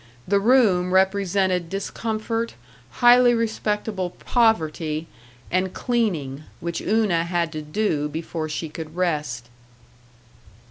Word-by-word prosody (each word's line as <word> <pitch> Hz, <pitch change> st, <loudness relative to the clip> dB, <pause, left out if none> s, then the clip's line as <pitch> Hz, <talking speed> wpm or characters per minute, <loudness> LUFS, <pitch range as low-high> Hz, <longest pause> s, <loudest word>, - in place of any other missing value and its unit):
The 200 Hz, +2 st, +3 dB
room 200 Hz, -6 st, +3 dB
represented 190 Hz, -2 st, +2 dB
discomfort, 225 Hz, +4 st, -3 dB, 0.5 s
highly 245 Hz, 0 st, +7 dB
respectable 210 Hz, -4 st, -1 dB
poverty 165 Hz, -9 st, 0 dB, 0.5 s
and 185 Hz, +1 st, 0 dB
cleaning, 170 Hz, -, -1 dB, 0.2 s
which 170 Hz, 0 st, -4 dB
Una 210 Hz, -6 st, +2 dB
had 170 Hz, -1 st, -1 dB
to 155 Hz, -1 st, -5 dB
do 150 Hz, -2 st, -1 dB
before 160 Hz, +1 st, -4 dB
she 155 Hz, +2 st, -3 dB
could 155 Hz, +1 st, -8 dB
rest. 150 Hz, -9 st, -1 dB
185 Hz, 100 wpm, -23 LUFS, 160-215 Hz, 0.5 s, highly